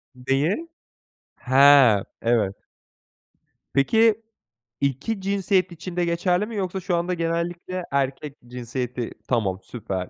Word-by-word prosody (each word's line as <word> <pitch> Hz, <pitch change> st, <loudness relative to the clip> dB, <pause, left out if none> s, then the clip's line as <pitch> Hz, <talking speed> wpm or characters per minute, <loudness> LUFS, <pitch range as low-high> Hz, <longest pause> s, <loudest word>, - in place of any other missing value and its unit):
Neyi? 135 Hz, -, 0 dB, 0.7 s
He, 130 Hz, -5 st, +6 dB, 0.2 s
evet. 115 Hz, -5 st, +1 dB, 1.2 s
Peki, 220 Hz, +10 st, +3 dB, 0.6 s
iki 140 Hz, -, -1 dB
cinsiyet 195 Hz, -1 st, +1 dB
için 170 Hz, +1 st, -8 dB
de 175 Hz, -1 st, +1 dB
geçerli 180 Hz, +3 st, +1 dB
mi 225 Hz, +1 st, -8 dB
yoksa 190 Hz, -2 st, -2 dB
şu 185 Hz, -1 st, -1 dB
anda 170 Hz, +2 st, -1 dB
genellikle 170 Hz, +2 st, -3 dB
erkek 140 Hz, +1 st, -2 dB
cinsiyeti 125 Hz, 0 st, -4 dB, 0.2 s
Tamam 100 Hz, -7 st, 0 dB
süper. 95 Hz, -6 st, -5 dB
155 Hz, 105 wpm, -24 LUFS, 125-185 Hz, 1.2 s, He